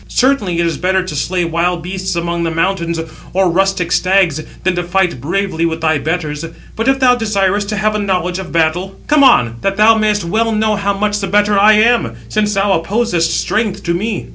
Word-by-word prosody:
Certainly 245 -10 +1
it 170 - +1
is 165 - -2
better 190 +1 +1
to 150 - -6
slay 175 +4 -1
wild 170 +1 -1
beasts 185 0 -4
among 170 0 -2
the 165 - 0
mountains, 170 0 -1 0.3
or 185 -1 +2
rustic 190 -1 0
stags, 185 -5 +2 0.2
than 185 - +1
to 175 - -1
fight 175 -5 -1
bravely 175 +1 -2
with 165 -1 -1
thy 160 -2 +1
betters. 155 0 -3 0.3
But 225 +3 -2
if 270 0 +3
thou 255 -2 +5
desirest 205 -3 0
to 215 - -2
have 215 +2 0
a 210 - -1
knowledge 185 -2 -1
of 185 -2 -7
battle, 170 +4 0
come 295 -1 +3
on, 125 - +4
that 195 0 -1
thou 215 +2 +6
mayest 210 -2 +1
well 225 +6 0
know 215 0 +1
how 200 0 -1
much 210 0 -1
the 195 - -3
better 205 +2 +2
I 210 +2 +6
am; 215 - +2
since 210 - 0
thou 195 0 +1
opposest 175 -2 0
strength 215 -2 -2
to 170 - -1
me." 205 +4 -3
190 Hz, 210 wpm, -15 LUFS, 170-210 Hz, 0.3 s, thou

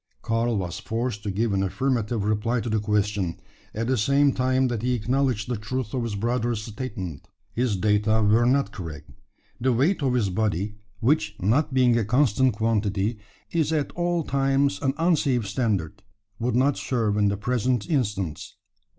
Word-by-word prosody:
Karl 115 0 0
was 90 -1 -3
forced 115 +1 -3
to 105 - -4
give 105 +2 0
an 95 - +1
affirmative 115 +1 -1
reply 110 +3 0
to 115 0 -3
the 110 - +2
question, 105 -4 -1 0.3
at 115 +2 -3
the 130 +2 +1
same 140 +5 +4
time 130 +1 +2
that 120 -4 -2
he 125 +1 0
acknowledged 125 -1 0
the 125 - -1
truth 115 +2 -4
of 130 - 0
his 115 -3 -3
brother's 120 +1 -1
statement. 105 - -6 0.3
His 120 -3 0
data 105 +2 +2
were 110 +3 +4
not 135 -4 +2
correct. 80 -7 -8 0.5
The 130 +2 +2
weight 145 +10 +2
of 130 -3 +1
his 105 -6 +1
body 105 0 -1 0.2
which, 105 -5 +1
not 120 - +2
being 125 -3 +4
a - - +1
constant 125 +2 +3
quantity, 105 -1 0 0.3
is 160 -2 +1
at 150 -3 0
all 175 -1 0
times 140 0 +1
an 135 -1 0
unsafe 145 - +2
standard 100 - -1 0.4
would 120 +1 0
not 135 +3 +3
serve 115 -5 0
in 105 -1 +3
the 100 0 0
present 125 +1 0
instance. 105 - -2
115 Hz, 170 wpm, -25 LUFS, 105-130 Hz, 0.5 s, same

